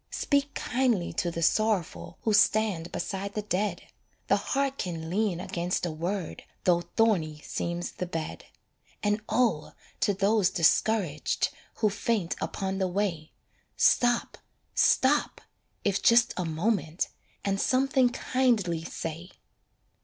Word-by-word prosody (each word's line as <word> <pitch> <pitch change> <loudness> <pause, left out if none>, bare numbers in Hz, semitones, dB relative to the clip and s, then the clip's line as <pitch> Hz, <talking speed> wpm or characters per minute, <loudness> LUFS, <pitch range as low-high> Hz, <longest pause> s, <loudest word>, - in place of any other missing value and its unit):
Speak 285 0 0
kindly 240 -8 0
to 175 - 0
the 165 0 -3
sorrowful 215 0 0
Who 220 - +1
stand 205 -5 +3
beside 200 0 -4
the 210 - -2
dead, 200 -2 -1 0.5
The - - +5
heart 275 0 -1
can 165 -3 -4
lean 200 -3 0
against 180 0 -2
a 175 - -2
word 175 +3 -4 0.2
Though 175 -1 +3
thorny 175 -8 +1
seems 175 0 -3
the 180 - -5
bed. 165 -3 -5 0.6
And 210 +1 +1
oh, 220 -11 +1 0.3
to 205 - +2
those 200 0 +3
discouraged 175 -2 +1 0.3
Who 215 -2 +1
faint 205 -3 -1
upon 190 0 -3
the 190 - +1
way, 180 -4 -2 0.5
Stop, 240 -1 +3 0.3
stop 280 +3 +3 0.4
if 200 -1 +1
just 235 0 +5
a 180 - -2
moment 165 0 -1 0.4
And 195 0 0
something 260 -1 +3
kindly 235 -10 0
say. 165 +2 -6
195 Hz, 125 wpm, -28 LUFS, 170-220 Hz, 0.6 s, The